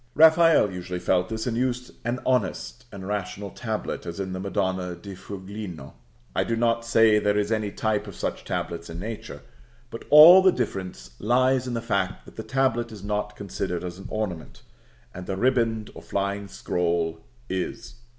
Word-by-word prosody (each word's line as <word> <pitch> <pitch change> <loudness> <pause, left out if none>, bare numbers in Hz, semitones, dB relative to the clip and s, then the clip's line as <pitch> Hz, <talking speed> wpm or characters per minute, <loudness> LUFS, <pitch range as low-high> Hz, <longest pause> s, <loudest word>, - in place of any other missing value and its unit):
Raphael 160 - +6
usually 90 0 -5
felt 90 +1 +1
this, 110 0 -3
and 120 -3 -1
used 125 0 -1
an 120 +1 -2
honest 95 - -1
and 95 -2 -8
rational 100 -1 -4
tablet, - - -4
as 85 +2 -6
in 95 -1 -3
the 95 - -4
Madonna 95 -2 -2
di 95 +3 -9
Fuligno. 95 -5 -8 0.4
I - - +2
do 115 - -1
not 115 0 +1
say 115 -2 +5
there 105 0 +1
is 105 +1 0
any 110 -2 0
type 110 +1 -1
of - - -9
such - - -3
tablets 85 0 -4
in 80 +1 -6
nature, 110 +3 -7 0.5
but 115 - -8
all 165 +5 +10
the 190 0 +6
difference 95 - -4
lies 130 +3 +2
in 120 - -2
the 115 - -2
fact - - -1
that - - -15
the - - -5
tablet 130 -3 0
is 105 -3 -10
not 105 0 -2
considered 90 -3 -4
as 90 0 -6
an 95 - -8
ornament, 100 -7 -4 0.5
and 90 0 -8
the 95 - -2
riband, 115 -2 +1
or - - -10
flying 100 0 -2
scroll, 85 -3 -1 0.3
is. 95 +4 -4
105 Hz, 180 wpm, -25 LUFS, 95-115 Hz, 0.5 s, all